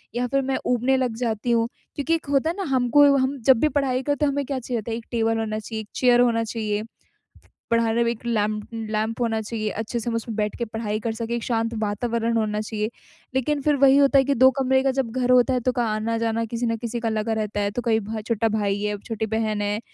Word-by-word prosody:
या 245 +1 0
फिर 275 +2 +1
मैं 265 0 -1
ऊबने 250 +2 +2
लग 250 -3 -1
जाती 235 -1 -1
हूँ 230 -1 +2 0.3
क्योंकि 295 +3 +1
एक 325 - -5
होता 285 +3 +2
है 340 - -2
ना, 395 - -2
हमको 260 +3 +5
हम 265 +2 0
जब 260 -3 +7
भी 305 - +3
पढ़ाई 255 -2 0
करते 290 +2 0
हैं 280 - +2
हमें 280 0 -2
क्या 270 0 -3
चाहिए 245 0 -3
होता 225 +2 -6
है, 225 - -2
एक 230 - -9
टेबल 225 -1 +1
होना 215 -1 -2
चाहिए, 220 +1 -5
एक 210 - -12
चेयर 245 -1 +4
होना 230 -2 +2
चाहिए, 215 -2 -2 0.9
पढ़ाई 230 -1 +2
में 235 - +1
एक 235 0 -8
लैं 215 -3 +1 0.4
लैंप 220 +2 -1
होना 225 -2 +1
चाहिए, 215 0 -3
अच्छे 225 +3 -3
से 235 - -3
हम 230 - -2
उसमें 230 -1 -4
बैठ 210 -1 -1
के 235 - -3
पढ़ाई 220 -1 -3
कर 225 0 -2
सके, 230 +1 -3
एक 235 - -4
शांत 230 -1 -1
वातावरण 230 +2 -1
होना 210 -1 0
चाहिए। 215 0 -3 0.5
लेकिन 285 +2 0
फिर 295 +1 +2
वही 275 0 +5
होता 280 0 +5
है 270 - +4
कि 280 - +2
2 260 +2 +7
कमरे 265 0 +3
का 270 - +2
जब 260 -3 -1
घर 250 0 +2
होता 250 +1 +5
है, 250 - +1
तो 255 +1 0
क - - +2
आना-जाना 225 0 0
किसी 230 +2 -3
न 230 -1 0
किसी 235 +1 -4
का 230 - -1
लगा 220 +1 -1
रहता 215 -1 -2
है 200 0 0
तो 245 - -3
कहीं 220 -1 +3
भ 215 +1 -5
छोटा 230 -1 +1
भाई 205 -2 0
है, 210 0 -1
छोटी 220 +1 -4
बहन 220 -1 -1
है 205 +1 -1
230 Hz, 255 wpm, -24 LUFS, 220-255 Hz, 0.9 s, जब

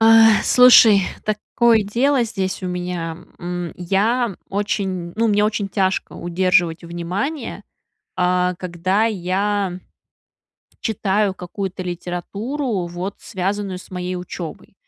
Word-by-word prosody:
Э, 225 - +5 0.4
слушай, 240 -5 +7 0.2
такое 220 +2 +2
дело 250 +6 +2
здесь 195 -4 -3
у - - -2
меня, 175 -2 -3 0.2
м. 175 -1 -4
Я 200 +4 0
очень 190 -3 -2
ну, 230 +1 +2
мне 210 0 +3
очень 210 -2 -1
тяжко 190 -2 0
удерживать 175 -1 +1
внимание, 195 - -4 0.6
э, 180 0 +2
когда 185 +4 0
я 195 -1 -1 1.0
читаю 205 -2 0
какую-то 185 +1 -5
литературу, 190 - -3
вот 175 +3 -5
связанную 195 -1 -3
с - - -15
моей 180 0 -4
учебой. 180 0 -7
190 Hz, 110 wpm, -20 LUFS, 180-210 Hz, 1.0 s, слушай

